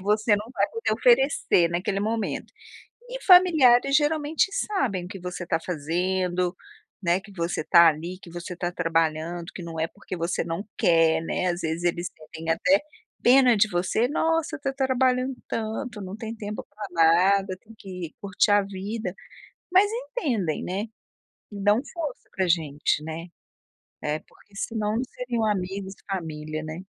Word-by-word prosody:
E, -, -, -11 dB
você 210 Hz, +1 st, +3 dB
não 210 Hz, -, -5 dB
vai -, -, +1 dB
poder 455 Hz, 0 st, -1 dB
oferecer, -, -, +3 dB
naquele 185 Hz, +3 st, -1 dB
momento, 220 Hz, +1 st, -2 dB, 0.6 s
e -, -, -6 dB
familiares, 300 Hz, -9 st, +6 dB
geralmente, 305 Hz, +2 st, +2 dB
sabem 255 Hz, -, -1 dB
o -, -, -8 dB
que 195 Hz, +1 st, -8 dB
você 180 Hz, 0 st, -5 dB
tá 170 Hz, -, 0 dB
fazendo, 180 Hz, +2 st, -1 dB, 0.5 s
né, 175 Hz, +1 st, +2 dB
que 200 Hz, +1 st, -15 dB
você 170 Hz, -3 st, -2 dB
tá 170 Hz, +2 st, +7 dB
ali, 170 Hz, +4 st, -5 dB
que 175 Hz, -3 st, -13 dB
você 175 Hz, +1 st, -6 dB
tá 175 Hz, 0 st, -2 dB
trabalhando, 165 Hz, 0 st, 0 dB
que -, -, -7 dB
não 165 Hz, -2 st, -6 dB
é 160 Hz, -, +1 dB
porque 185 Hz, 0 st, -8 dB
você 170 Hz, +1 st, -1 dB
não 170 Hz, +4 st, -4 dB
quer, 165 Hz, -1 st, +4 dB
né. 165 Hz, -, -2 dB
Às 175 Hz, +1 st, -5 dB
vezes, 160 Hz, +1 st, -2 dB
eles 175 Hz, 0 st, 0 dB
sentem, 160 Hz, +1 st, -9 dB
até, 180 Hz, +4 st, +3 dB, 0.4 s
pena 250 Hz, -1 st, +6 dB
de 210 Hz, +1 st, +3 dB
você, 185 Hz, +6 st, +1 dB
nossa, 320 Hz, +2 st, 0 dB
tá 275 Hz, -2 st, -3 dB
trabalhando 260 Hz, -1 st, +1 dB
tanto, 220 Hz, 0 st, -4 dB
não 190 Hz, 0 st, -6 dB
tem 225 Hz, 0 st, -6 dB
tempo 210 Hz, -1 st, -6 dB
pra 205 Hz, 0 st, -8 dB
nada, 185 Hz, +4 st, +4 dB
tem 225 Hz, -, -16 dB
que 180 Hz, -5 st, -7 dB
curtir 200 Hz, +1 st, +1 dB
a 205 Hz, 0 st, +5 dB
vida, 200 Hz, +1 st, -5 dB, 0.6 s
mas 390 Hz, +3 st, +5 dB
entendem, 300 Hz, -, -2 dB
né, 195 Hz, +4 st, -2 dB, 0.7 s
e 200 Hz, -1 st, -7 dB
dão 205 Hz, +2 st, +4 dB
força 315 Hz, -7 st, -5 dB
pra 190 Hz, -2 st, +1 dB
gente, 150 Hz, -3 st, +1 dB
né 160 Hz, +2 st, -6 dB, 0.7 s
É 150 Hz, +1 st, -2 dB
porque, 200 Hz, -, -25 dB
senão 215 Hz, 0 st, -2 dB
não 240 Hz, -, 0 dB
seriam 245 Hz, -2 st, -3 dB
amigos 195 Hz, -1 st, -2 dB
e 195 Hz, -, -10 dB
família, 155 Hz, -3 st, -5 dB
né. 160 Hz, +4 st, -7 dB
195 Hz, 165 wpm, -25 LUFS, 170-235 Hz, 0.7 s, tá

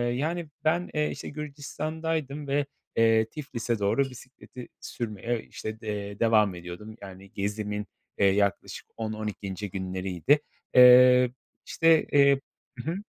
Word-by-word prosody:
yani 160 Hz, +5 st, -2 dB, 0.2 s
ben, 175 Hz, +3 st, +1 dB
eee, 150 Hz, -1 st, +1 dB
işte -, -, -7 dB
Gürcistan'daydım 150 Hz, 0 st, -4 dB
ve 140 Hz, +1 st, +1 dB, 0.3 s
eee, 115 Hz, -1 st, +4 dB
Tiflis'e 120 Hz, -6 st, -4 dB
doğru 100 Hz, +7 st, +2 dB
bisikleti 125 Hz, 0 st, -12 dB
sürmeye 115 Hz, +1 st, -4 dB
işte 110 Hz, 0 st, -7 dB
d 110 Hz, -, -9 dB
eee, 100 Hz, -1 st, -4 dB
devam 110 Hz, -4 st, +3 dB
ediyordum. 90 Hz, +5 st, -9 dB
Yani, 95 Hz, 0 st, -11 dB
gezimin, 105 Hz, +1 st, -3 dB, 0.3 s
eee, 100 Hz, -, +3 dB
yaklaşık 100 Hz, 0 st, 0 dB
10-12. 105 Hz, -2 st, -4 dB
günleriydi. 95 Hz, -, 0 dB, 0.4 s
Eee, 125 Hz, 0 st, +8 dB, 0.3 s
işte, 165 Hz, -1 st, +4 dB
eee 140 Hz, -1 st, +5 dB, 0.4 s
Hı 130 Hz, +7 st, -3 dB
hı, 175 Hz, -, -3 dB
115 Hz, 125 wpm, -27 LUFS, 100-140 Hz, 0.4 s, Eee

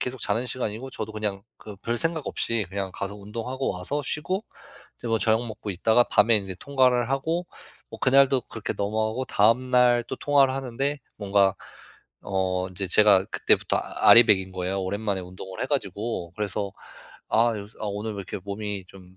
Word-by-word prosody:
계속 125 Hz, 0 st, -4 dB
자는 115 Hz, +4 st, 0 dB
시간이고 125 Hz, +1 st, -4 dB
저도 110 Hz, -3 st, -5 dB
그냥 105 Hz, -2 st, -3 dB, 0.2 s
그 105 Hz, -2 st, -10 dB
별생각 150 Hz, +9 st, -1 dB
없이 115 Hz, -4 st, -1 dB
그냥 95 Hz, -1 st, -3 dB
가서 100 Hz, +1 st, -4 dB
운동하고 115 Hz, +6 st, -4 dB
와서 120 Hz, +11 st, -3 dB
쉬고 185 Hz, +10 st, -2 dB, 0.5 s
이제 120 Hz, -, -6 dB
뭐 115 Hz, 0 st, +2 dB
저녁 110 Hz, +2 st, +2 dB
먹고 110 Hz, -1 st, -6 dB
있다가 110 Hz, +6 st, +3 dB
밤에 115 Hz, -1 st, +5 dB
인제 95 Hz, -2 st, -3 dB
통화를 125 Hz, -3 st, +2 dB
하고 160 Hz, +6 st, -1 dB, 0.4 s
뭐 -, -, -9 dB
그날도 135 Hz, -1 st, +4 dB
그렇게 115 Hz, -2 st, -5 dB
넘어가고 110 Hz, +4 st, -1 dB
다음 115 Hz, +4 st, +2 dB
날 125 Hz, -1 st, +4 dB
또 -, -, -4 dB
통화를 140 Hz, -2 st, +3 dB
하는데 135 Hz, +2 st, -2 dB, 0.2 s
뭔가 100 Hz, -1 st, +2 dB, 0.7 s
어, 95 Hz, -1 st, -1 dB
인제 95 Hz, +1 st, -3 dB
제가 100 Hz, 0 st, +5 dB
그때부터 -, -, +2 dB
아 -, -, +2 dB
알이 115 Hz, 0 st, +10 dB
배긴 95 Hz, -1 st, +2 dB
거예요. 95 Hz, +1 st, -2 dB
오랜만에 100 Hz, +1 st, -2 dB
운동을 95 Hz, +1 st, -8 dB
해 -, -, -1 dB
가지고. 105 Hz, -, -3 dB
그래서 105 Hz, -1 st, -2 dB, 0.6 s
아, 115 Hz, +1 st, +3 dB
요새 105 Hz, +2 st, -9 dB
"아, -, -, -3 dB
오늘 105 Hz, +2 st, -3 dB
왜 100 Hz, -, -7 dB
이렇게 95 Hz, -, -5 dB
몸이 100 Hz, -1 st, -4 dB
좀 95 Hz, -1 st, -16 dB
110 Hz, 365 characters per minute, -25 LUFS, 100-125 Hz, 0.7 s, 알이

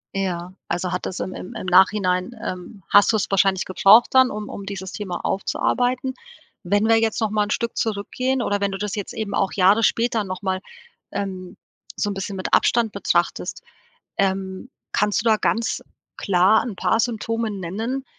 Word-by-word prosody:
Ja, 180 Hz, -2 st, -3 dB
also, 175 Hz, +1 st, -2 dB
hat 180 Hz, -, -2 dB
das 185 Hz, -, -5 dB
im 185 Hz, -, -4 dB
im 205 Hz, +6 st, -8 dB
im 220 Hz, -, -6 dB
Nachhinein, 185 Hz, +2 st, +3 dB
ähm, 185 Hz, +2 st, -7 dB
hast 205 Hz, +2 st, +6 dB
du -, -, +1 dB
es 215 Hz, -, +1 dB
wahrscheinlich 195 Hz, -1 st, +2 dB
gebraucht 200 Hz, +5 st, +6 dB
dann, 260 Hz, -1 st, +6 dB
um 210 Hz, 0 st, -5 dB
um 200 Hz, -, -7 dB
dieses 190 Hz, -1 st, -5 dB
Thema 190 Hz, -4 st, -4 dB
aufzuarbeiten. 250 Hz, +6 st, 0 dB, 0.5 s
Wenn 205 Hz, +3 st, +1 dB
wir 225 Hz, 0 st, +5 dB
jetzt 225 Hz, -1 st, 0 dB
noch 220 Hz, -2 st, 0 dB
mal 210 Hz, -1 st, +1 dB
'n 205 Hz, -, -9 dB
Stück 235 Hz, +1 st, -1 dB
zurückgehen 245 Hz, +5 st, -1 dB
oder 205 Hz, -2 st, -1 dB
wenn 200 Hz, -, +1 dB
du 195 Hz, -, -4 dB
das 205 Hz, 0 st, -4 dB
jetzt 205 Hz, -2 st, -4 dB
eben 215 Hz, -2 st, -4 dB
auch 195 Hz, -1 st, 0 dB
Jahre 200 Hz, +3 st, +4 dB
später 230 Hz, 0 st, +1 dB
noch 185 Hz, 0 st, -6 dB
mal, 190 Hz, -1 st, -1 dB, 0.5 s
ähm, 185 Hz, -2 st, -5 dB, 0.4 s
so 205 Hz, -, -1 dB
`n -, -, -3 dB
bisschen 195 Hz, +1 st, -5 dB
mit 185 Hz, -, -5 dB
Abstand 230 Hz, -2 st, +3 dB
betrachtest, -, -, -1 dB, 0.5 s
ähm, 190 Hz, +3 st, -1 dB, 0.2 s
kannst 210 Hz, 0 st, +1 dB
du -, -, +4 dB
da 215 Hz, -, +4 dB
ganz 230 Hz, +2 st, 0 dB, 0.3 s
klar 195 Hz, +3 st, +3 dB
'n 230 Hz, -5 st, -5 dB
paar 225 Hz, -, +1 dB
Symptome 230 Hz, -1 st, -1 dB
nennen, 215 Hz, +8 st, -4 dB
205 Hz, 185 wpm, -22 LUFS, 190-225 Hz, 0.5 s, hast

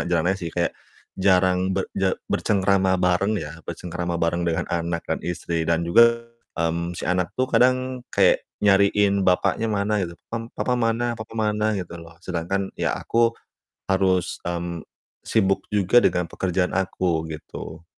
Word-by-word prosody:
jarang 85 Hz, -2 st, +1 dB
nanya 95 Hz, -, -5 dB
sih, 85 Hz, -, -3 dB
kayak 85 Hz, +1 st, -1 dB, 0.4 s
jarang 95 Hz, 0 st, +2 dB
berje 95 Hz, 0 st, -1 dB
bercengkrama 95 Hz, -2 st, +2 dB
bareng 90 Hz, +4 st, +1 dB
ya, 80 Hz, -2 st, -6 dB
bercengkrama 85 Hz, 0 st, -4 dB
bareng 85 Hz, +1 st, 0 dB
dengan 80 Hz, -, 0 dB
anak 85 Hz, 0 st, -2 dB
dan -, -, -2 dB
istri 85 Hz, -1 st, -3 dB
dan 85 Hz, 0 st, +2 dB
juga, 115 Hz, +7 st, +5 dB, 0.3 s
mmm, 85 Hz, +1 st, -1 dB
si -, -, -5 dB
anak 90 Hz, 0 st, -1 dB
tuh 130 Hz, 0 st, -1 dB
kadang 130 Hz, 0 st, +2 dB
kayak -, -, +3 dB, 0.2 s
nyariin 100 Hz, -1 st, +4 dB
bapaknya 90 Hz, +5 st, +1 dB
mana 105 Hz, 0 st, 0 dB
gitu, 85 Hz, -2 st, -4 dB, 0.2 s
pam 115 Hz, 0 st, -4 dB
"Papa 125 Hz, -, 0 dB
mana? 120 Hz, 0 st, +1 dB
Papa 110 Hz, -1 st, -9 dB
mana?" 105 Hz, 0 st, +1 dB
Gitu 90 Hz, -2 st, -6 dB
loh. 85 Hz, 0 st, -14 dB
Sedangkan 95 Hz, +2 st, -2 dB
ya -, -, 0 dB
aku 115 Hz, 0 st, +2 dB, 0.6 s
harus, 95 Hz, -2 st, +1 dB
mmm, 85 Hz, -1 st, -4 dB, 0.4 s
sibuk 95 Hz, -3 st, +1 dB
juga 105 Hz, +3 st, +4 dB
dengan 90 Hz, -, +2 dB
pekerjaan 90 Hz, +2 st, -1 dB
aku 90 Hz, -3 st, -1 dB
gitu. 80 Hz, +1 st, -8 dB
95 Hz, 150 wpm, -23 LUFS, 85-105 Hz, 0.6 s, juga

